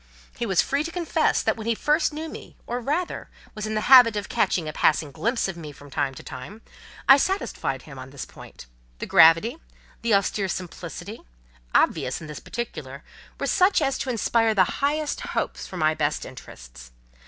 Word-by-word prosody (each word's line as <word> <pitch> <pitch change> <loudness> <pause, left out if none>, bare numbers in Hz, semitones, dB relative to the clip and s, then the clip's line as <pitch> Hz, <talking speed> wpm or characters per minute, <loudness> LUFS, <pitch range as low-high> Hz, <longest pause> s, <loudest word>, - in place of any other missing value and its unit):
He 235 - -3
was 190 -4 +3
free 280 +2 0
to 335 - -5
confess 345 -1 +1
that - - +1
when 220 0 -7
he 230 - +2
first 300 +7 +1
knew 310 +2 -5
me—or, 245 -5 -7
rather, 310 +8 -2 0.2
was 215 0 -5
in 215 - -3
the 215 - 0
habit 245 -3 +8
of 205 -1 -4
catching 165 -4 +1
a 155 - -4
passing 150 -1 +2
glimpse 230 - -1
of 190 - -5
me 155 -3 -8
from 145 0 -15
time 135 0 -1
to - - -10
time—I 210 - 0
satisfied 275 - -2
him 140 -4 -11
on 130 0 -9
this 135 -1 -7
point: - - -13 0.3
the - - -5
gravity, 165 - +5 0.4
the 230 -3 +3
austere 200 0 0
simplicity, 180 -1 -6 0.5
obvious - - +2
in 155 - -9
this 150 -2 -7
particular, 145 - -6 0.4
were - - -1
such 370 +1 +3
as 275 -3 0
to 265 - -3
inspire 225 -1 +2
the 190 - +6 0.2
highest 295 +2 0
hopes - - -3
for - - -8
my 155 0 +2
best 150 -1 -1
interests. - - -12
215 Hz, 185 wpm, -25 LUFS, -, 0.5 s, habit